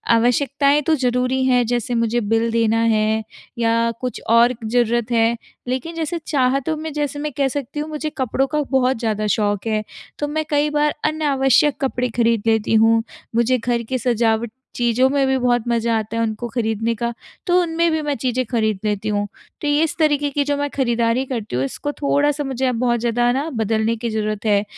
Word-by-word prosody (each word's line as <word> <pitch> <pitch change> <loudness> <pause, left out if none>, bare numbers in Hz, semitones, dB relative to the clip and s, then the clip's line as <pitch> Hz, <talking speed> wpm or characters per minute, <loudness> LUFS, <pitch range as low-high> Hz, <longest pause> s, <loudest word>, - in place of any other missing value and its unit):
आवश्यकताएँ 280 +5 +2
तो 320 - +4
ज़रूरी 255 0 0
हैं, 250 -2 +3
जैसे 240 0 -1
मुझे 230 +1 +1
बिल 225 +2 +1
देना 225 0 +2
है 220 -1 +2 0.3
या 230 0 +2
कुछ 250 -1 -4
और 235 +2 +5
ज़रूरत 235 0 +1
है। 230 0 +3 0.3
लेकिन 260 +7 -3
जैसे 330 +1 -2
चाहतों 275 +1 +1
में 315 +1 -5
जैसे 290 -1 -2
मैं 300 0 -3
कह 275 - +2
सकती 280 +1 -4
हूँ 300 +1 -4
मुझे 305 0 -3
कपड़ों 260 +1 0
का 300 +1 -1
बहुत 260 -1 +2
ज़्यादा 215 -2 -1
शौक 205 0 0
है, 215 -1 0 0.4
तो 295 - -1
मैं 310 +1 -2
कई 295 0 +2
बार 295 0 +1
अनावश्यक 290 -2 +2
कपड़े 250 -2 0
खरीद 230 -2 +2
लेती 225 0 +2
हूँ। 225 +1 +4 0.3
मुझे 235 +2 +3
घर 235 0 -1
की 260 - 0
सजावट 230 -2 0 0.2
चीज़ों 240 +1 +2
में 275 -1 +2
भी 265 0 +2
बहुत 245 -2 +1
मज़ा 230 -1 +1
आता 220 +1 -6
है - - +1
उनको 220 +2 -3
खरीदने 225 -1 -1
का, 235 +2 -2 0.3
तो 360 0 +4
उनमें 335 0 +1
भी 315 -1 0
मैं 295 -1 -1
चीज़ें 255 +1 -1
खरीद 220 -4 0
लेती 210 0 -1
हूँ। 205 0 -1 0.3
तो 295 - -2
ये 290 +2 +3
इस 320 - -1
तरीके 290 -2 +2
की 285 0 0
जो 285 0 -1
मैं 285 0 -1
खरीदारी 235 -1 +1
करती 230 - -4
हूँ 130 - 0
इसको 290 - -4
थोड़ा-सा 290 0 0
मुझे 265 -1 -2
अब 250 - 0
बहुत 240 -1 +1
ज़्यादा 240 +1 +1
ना 285 +5 -1
बदलने 220 0 0
की 230 +1 -4
ज़रूरत 215 0 -3
है। 205 -1 +3
245 Hz, 200 wpm, -20 LUFS, 225-285 Hz, 0.4 s, और